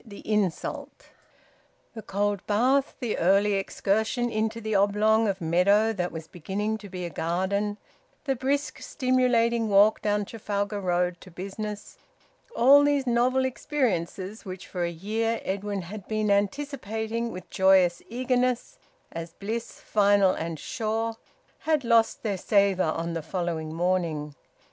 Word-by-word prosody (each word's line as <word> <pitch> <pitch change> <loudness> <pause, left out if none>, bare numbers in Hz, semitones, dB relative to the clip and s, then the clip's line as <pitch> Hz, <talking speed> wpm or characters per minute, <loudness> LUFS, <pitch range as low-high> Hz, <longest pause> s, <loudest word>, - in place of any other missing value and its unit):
THE 205 -4 -11
INSULT. 210 -5 -2 0.9
The 220 - -7
cold 205 -1 -1
bath, 255 +6 +2
the 240 -5 -2
early 200 +4 +3
excursion 220 +5 0
into 220 +1 -1
the 220 -1 -3
oblong 210 +2 +3
of 195 -1 -1
meadow 200 +6 +3
that 180 -4 -2
was 160 -1 -7
beginning 205 +6 -3
to 205 -1 -11
be 180 -1 -5
a 170 - -5
garden, 195 +6 -1 0.5
the 270 -2 +1
brisk 280 +3 -1
stimulating 240 -4 +1
walk 205 +2 +5
down 205 -1 0
Trafalgar 205 -1 -3
Road 180 -1 0
to 185 - -12
business, 200 +4 -7 0.6
all 280 +4 +7
these 285 -2 +2
novel 250 +2 +2
experiences, 220 - -2
which 185 -3 -8
for 180 -2 -4
a - - -1
year 220 +7 -2
Edwin 200 0 -3
had 200 +3 -9
been 215 -1 0
anticipating 225 0 -1
with 185 - -9
joyous 190 -2 +4
eagerness 250 +1 -1 0.3
as 165 0 -7
bliss 225 +5 -5
final 200 -2 +4
and 165 -2 -4
sure, 225 0 -2 0.4
had 310 -3 +1
lost 230 -1 +3
their 200 -4 -1
savour 195 -4 +2
on 165 +1 -3
the 165 - -3
following 165 -1 -3
morning. 165 -3 -1
205 Hz, 140 wpm, -26 LUFS, 185-230 Hz, 0.9 s, all